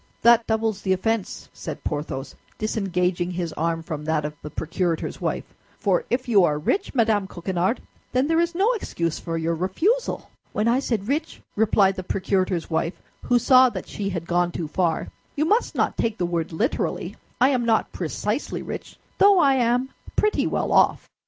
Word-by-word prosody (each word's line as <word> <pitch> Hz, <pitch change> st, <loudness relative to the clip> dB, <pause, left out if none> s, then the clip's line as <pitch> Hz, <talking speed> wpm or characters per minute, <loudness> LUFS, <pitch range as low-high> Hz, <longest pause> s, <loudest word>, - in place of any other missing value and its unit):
"That 235 Hz, 0 st, +6 dB
doubles 220 Hz, -2 st, 0 dB
the 190 Hz, -, +2 dB
offense," 225 Hz, +2 st, -2 dB
said -, -, -7 dB
Porthos, 145 Hz, -2 st, -4 dB, 0.2 s
disengaging 180 Hz, -4 st, 0 dB
his 175 Hz, -3 st, -3 dB
arm 165 Hz, +1 st, -1 dB
from 155 Hz, -2 st, -5 dB
that 155 Hz, -1 st, 0 dB
of 150 Hz, -, -4 dB
the 150 Hz, -, -7 dB
procurator's 165 Hz, +2 st, -2 dB
wife; -, -, -1 dB, 0.4 s
"for 480 Hz, -, +1 dB
if 250 Hz, +1 st, -1 dB
you 205 Hz, -6 st, +5 dB
are 150 Hz, -3 st, +2 dB
rich, 380 Hz, -, -1 dB
Madame 220 Hz, -5 st, +2 dB
Coquenard, 185 Hz, +5 st, -1 dB, 0.3 s
then 255 Hz, +2 st, +2 dB
there 325 Hz, +1 st, +2 dB
is 340 Hz, 0 st, 0 dB
no 400 Hz, +6 st, +3 dB
excuse 170 Hz, -, -2 dB
for 165 Hz, -1 st, -3 dB
your 165 Hz, +1 st, 0 dB
refusal." 320 Hz, -, 0 dB, 0.2 s
"When 210 Hz, +2 st, +1 dB
I 240 Hz, +2 st, +3 dB
said 225 Hz, -7 st, -2 dB
rich," 305 Hz, +5 st, -2 dB
replied 205 Hz, -3 st, +3 dB
the -, -, -2 dB
procurator's 185 Hz, -2 st, 0 dB
wife, 165 Hz, +1 st, -1 dB, 0.3 s
who 245 Hz, -, +4 dB
saw 255 Hz, +1 st, +6 dB
that -, -, -6 dB
she 200 Hz, -2 st, -3 dB
had 170 Hz, -4 st, -4 dB
gone 175 Hz, 0 st, +1 dB
too 170 Hz, -2 st, -4 dB
far, 170 Hz, +1 st, 0 dB, 0.3 s
"you 305 Hz, -, +1 dB
must 430 Hz, +8 st, +1 dB
not -, -, 0 dB
take 225 Hz, -1 st, 0 dB
the 180 Hz, -, 0 dB
word 170 Hz, -1 st, -2 dB
literally. 220 Hz, -, -1 dB, 0.2 s
I 255 Hz, -, +5 dB
am 255 Hz, -3 st, +1 dB
not 225 Hz, -2 st, +2 dB
precisely 210 Hz, -, -3 dB
rich, -, -, -7 dB, 0.2 s
though 400 Hz, -1 st, +7 dB
I 280 Hz, -6 st, +5 dB
am 250 Hz, 0 st, +2 dB, 0.3 s
pretty 425 Hz, 0 st, +2 dB
well -, -, -1 dB
off." -, -, +3 dB
195 Hz, 180 wpm, -24 LUFS, 170-250 Hz, 0.4 s, though